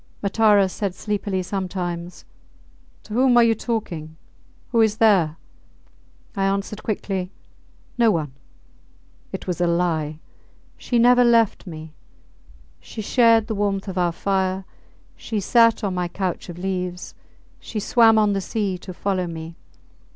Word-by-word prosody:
Matara 205 -1 +4
said 190 0 -4
sleepily 200 -2 -2
sometimes, 180 -2 -4 0.8
To 210 - -10
whom 250 +1 +4
are 240 - +7
you 230 -1 +4
talking? 175 -9 -4 0.5
Who 230 -2 +3
is 220 -1 +2
there? 185 -9 +3 1.0
I 195 - -1
answered 200 +2 -2
quickly, 195 -4 -3 0.7
No 230 -1 +5
one... 155 -8 -1 1.0
It - - -6
was 180 -1 -3
a 175 - +3
lie! 165 -3 0 0.6
She 245 - -2
never 245 +1 +6
left 230 -4 +3
me. 160 -2 -9 0.9
She 215 - -8
shared 230 -1 +4
the 220 - -3
warmth 200 -1 -1
of 190 -1 -3
our 175 -1 +2
fire, 190 +1 -1 0.5
she 220 - -4
sat 230 +3 +3
on 195 -2 -1
my 180 -1 -1
couch 180 0 -4
of 175 - -8
leaves, 180 -1 -4 0.5
she 220 - -5
swam 225 +1 +4
on 210 -1 +3
the 195 - -1
sea 195 -1 -2
to 185 0 -9
follow 185 -2 -1
me. 165 0 -7
195 Hz, 140 wpm, -22 LUFS, 180-220 Hz, 1.0 s, are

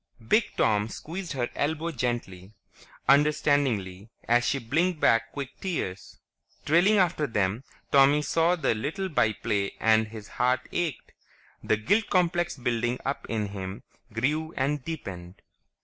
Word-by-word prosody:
Big 215 - +2
Tom 105 -1 +2
squeezed 170 - -6
her 125 -3 -1
elbow 160 +3 -1
gently, 115 - -4 0.5
understandingly, 135 -9 +2 0.2
as 120 +1 +4
she 140 - +1
blinked 160 +8 0
back 115 -3 +3
quick 140 -2 -5
tears. 130 - -4 0.5
Trailing 175 +8 +4
after 170 -5 +2
them, 105 +1 -1 0.3
Tommy 140 +2 +5
saw 165 +3 +2
the 150 -8 +1
little 155 - -3
by 120 -8 +2
play 100 -1 -2
and 110 0 +3
his 110 -1 -10
heart 125 +1 +1
ached. 165 -8 -3 0.5
The 110 - +2
guilt 205 - +1
complex 175 -2 +1
building 120 -1 -1
up 140 +1 -3
in 110 -3 -1
him 95 -1 -6 0.3
grew 150 +8 -1
and 140 +1 0
deepened. 95 - -7
130 Hz, 135 wpm, -27 LUFS, 110-160 Hz, 0.5 s, Tommy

